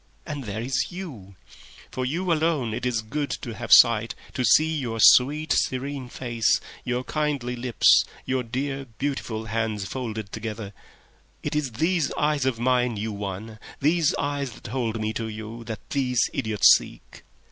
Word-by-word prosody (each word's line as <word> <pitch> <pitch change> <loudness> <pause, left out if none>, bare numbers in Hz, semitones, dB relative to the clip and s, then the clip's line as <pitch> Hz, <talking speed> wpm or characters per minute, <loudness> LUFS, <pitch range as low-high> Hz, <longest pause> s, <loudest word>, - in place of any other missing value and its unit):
And 145 -4 -5
there 105 +2 -4
is 130 +1 0
you. 130 - -8 0.6
For 130 - -3
you 170 +5 0
alone 155 -8 0
it 125 - -2
is 115 -3 -1
good 145 +6 -3
to 120 - -5
have 115 +1 -7
sight, 115 -2 +6 0.2
to 130 - -1
see 155 +7 +4
your 120 -6 -3
sweet, 145 +7 +6
serene 130 0 -2
face, 120 -3 +1 0.2
your 125 0 -2
kindly 140 -5 -2
lips, 120 -1 +4 0.2
your 130 0 0
dear, 135 +3 -3
beautiful 125 -6 -3
hands 110 -2 -2
folded 110 -2 -5
together..... 110 -2 -6 0.7
It - - -2
is 145 -5 -1
these 165 +6 +1
eyes 150 -3 +1
of 120 -4 -1
mine 125 -2 +1
you 110 +2 -3
won, 105 +2 -6 0.2
these 160 +2 +2
eyes 140 -3 -2
that - - -11
hold 115 -3 -2
me 110 0 -2
to 115 0 -3
you, 110 +2 -7
that 110 -2 -7
these 125 -3 +1
idiots 110 -1 +3
seek. - - -13
125 Hz, 160 wpm, -25 LUFS, 110-140 Hz, 0.7 s, sight